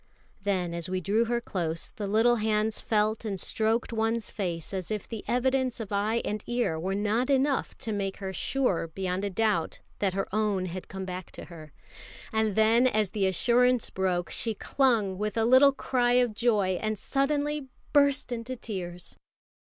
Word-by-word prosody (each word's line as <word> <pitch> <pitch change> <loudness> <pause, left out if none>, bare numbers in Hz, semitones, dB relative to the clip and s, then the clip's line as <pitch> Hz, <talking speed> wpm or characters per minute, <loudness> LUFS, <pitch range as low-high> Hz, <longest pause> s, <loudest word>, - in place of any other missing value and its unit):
Then, 185 -4 -1
as 170 0 -4
we 185 0 -1
drew 205 +6 +1
her 240 +1 0
close, 170 -8 -3
the 205 -2 -4
little 225 +4 +3
hands 215 0 0
felt 215 0 +1
and 200 -4 -3
stroked 225 +5 0
one's 225 0 0
face 175 -4 -4
as 185 -2 -3
if 215 -2 -3
the 225 -3 -6
evidence 255 0 +1
of 215 -3 -6
eye 210 +3 0
and 210 0 -3
ear 240 -10 0
were 190 +4 -2
not 215 +5 0
enough 275 0 +1
to 225 - -4
make 195 -2 -2
her 190 -1 -5
sure 250 -8 0
beyond 185 +3 -3
a 200 - 0
doubt 205 -4 0 0.2
that 195 -2 0
her 195 - -1
own 210 -3 +1
had 185 +1 -6
come 190 0 -6
back 185 -1 -6
to - - -8
her; 155 -3 -12 0.6
and 220 -2 +1
then, 225 +3 +5
as 215 -5 +1
the 200 -3 +1
assurance 245 +6 +3
broke, 180 -2 -1
she 225 -2 0
clung 220 -7 +1
with 210 +1 -2
a 225 - +3
little 260 +4 +7
cry 245 -2 +1
of 245 -2 +3
joy, 210 -5 +1
and 215 -1 -1
suddenly 285 +4 -1 0.3
burst 285 -2 +3
into 240 +2 -4
tears. 180 -7 -6
215 Hz, 180 wpm, -28 LUFS, 190-240 Hz, 0.6 s, little